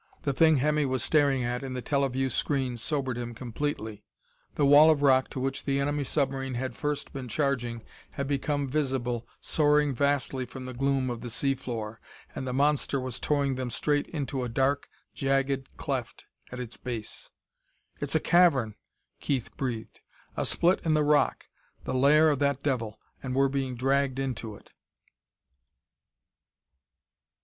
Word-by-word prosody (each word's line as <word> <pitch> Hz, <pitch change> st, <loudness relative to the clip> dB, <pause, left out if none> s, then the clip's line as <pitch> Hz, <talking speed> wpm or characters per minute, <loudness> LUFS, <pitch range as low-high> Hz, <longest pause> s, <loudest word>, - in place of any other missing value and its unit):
The 140 Hz, -, 0 dB
thing 160 Hz, +1 st, +5 dB
Hemmy 150 Hz, +1 st, +2 dB
was 130 Hz, -2 st, -1 dB
staring 140 Hz, -4 st, +3 dB
at 120 Hz, +1 st, -2 dB
in 130 Hz, -1 st, -5 dB
the 125 Hz, -, -3 dB
teleview 135 Hz, -2 st, 0 dB
screen 130 Hz, -3 st, 0 dB
sobered 130 Hz, +1 st, -1 dB
him 120 Hz, -1 st, -5 dB
completely. 115 Hz, -3 st, -4 dB, 0.5 s
The 145 Hz, -, +2 dB
wall 145 Hz, +3 st, +8 dB
of 150 Hz, -2 st, +3 dB
rock 130 Hz, -2 st, +4 dB
to -, -, -5 dB
which 135 Hz, +1 st, -2 dB
the 140 Hz, -1 st, 0 dB
enemy 145 Hz, +1 st, 0 dB
submarine 135 Hz, -2 st, -1 dB
had 130 Hz, -1 st, -3 dB
first 150 Hz, -1 st, -3 dB
been 135 Hz, -2 st, -5 dB
charging 120 Hz, -3 st, -1 dB, 0.3 s
had 140 Hz, -, -4 dB
become 145 Hz, 0 st, -1 dB
visible, 130 Hz, -4 st, -1 dB
soaring 150 Hz, -2 st, +3 dB
vastly 140 Hz, 0 st, 0 dB
from 130 Hz, +1 st, -8 dB
the 130 Hz, -, -6 dB
gloom 135 Hz, 0 st, 0 dB
of 120 Hz, -, -5 dB
the 120 Hz, -, -6 dB
sea 135 Hz, +3 st, +1 dB
floor. 115 Hz, -4 st, -6 dB, 0.3 s
And 130 Hz, -, -5 dB
the -, -, -1 dB
monster 140 Hz, +1 st, +1 dB
was 130 Hz, -2 st, -4 dB
towing 140 Hz, -2 st, +1 dB
them 130 Hz, -1 st, -3 dB
straight 145 Hz, +5 st, 0 dB
into 140 Hz, -4 st, -3 dB
a 125 Hz, -, -3 dB
dark, 135 Hz, +4 st, 0 dB, 0.2 s
jagged 135 Hz, 0 st, 0 dB
cleft -, -, -4 dB, 0.3 s
at 125 Hz, -, -6 dB
its 125 Hz, -1 st, -5 dB
base. 115 Hz, -4 st, -6 dB, 0.7 s
"It's 145 Hz, +1 st, -2 dB
a -, -, +5 dB
cavern!" 155 Hz, -11 st, +4 dB, 0.5 s
Keith 130 Hz, -5 st, -2 dB
breathed. 120 Hz, -5 st, -4 dB, 0.4 s
"A -, -, -1 dB
split 180 Hz, +3 st, +2 dB
in 160 Hz, -2 st, +2 dB
the 150 Hz, -, +3 dB
rock 150 Hz, 0 st, +2 dB, 0.4 s
the -, -, -3 dB
lair 150 Hz, +4 st, +5 dB
of 140 Hz, -, -1 dB
that 140 Hz, -1 st, 0 dB
devil. 115 Hz, -6 st, -2 dB, 0.2 s
And 130 Hz, -1 st, -4 dB
we're 135 Hz, 0 st, +3 dB
being 135 Hz, -2 st, -2 dB
dragged 135 Hz, +1 st, +1 dB
into 120 Hz, -5 st, -3 dB
it!" -, -, -18 dB
135 Hz, 160 wpm, -28 LUFS, 125-145 Hz, 0.7 s, wall